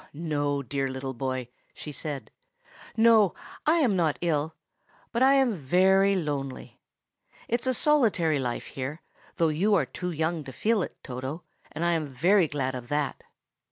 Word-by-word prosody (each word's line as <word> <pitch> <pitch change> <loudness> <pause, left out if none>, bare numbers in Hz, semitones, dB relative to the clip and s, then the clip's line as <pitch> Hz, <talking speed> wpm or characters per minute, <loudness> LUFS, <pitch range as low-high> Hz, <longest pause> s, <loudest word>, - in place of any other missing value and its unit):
"No, 145 -2 -1
dear 135 +2 -2
little 130 0 -5
boy!" 130 0 -3 0.3
she 150 - -7
said. 145 0 -5 0.7
"No, 220 -4 +5 0.3
I 315 - +5
am 265 - +3
not 165 -5 +1
ill; 160 -2 0 0.6
but 235 - -1
I 270 +1 +6
am 265 -4 +3
very 190 +5 +3
lonely. 145 -6 -4 0.7
It's 240 +2 -1
a 260 - +3
solitary 215 - +3
life 125 -2 -3
here, 140 +5 -6 0.3
though 165 -3 +2
you 195 +7 +2
are 165 -8 +2
too 180 +7 -5
young 160 0 -1
to 130 - -7
feel 220 - +1
it, - - -5
Toto, 130 +6 -5 0.3
and 160 +3 -3
I 175 - +3
am 160 -3 0
very 170 +8 +3
glad 135 -3 -2
of 125 -2 -6
that. 145 +1 -2
160 Hz, 160 wpm, -27 LUFS, 135-195 Hz, 0.7 s, I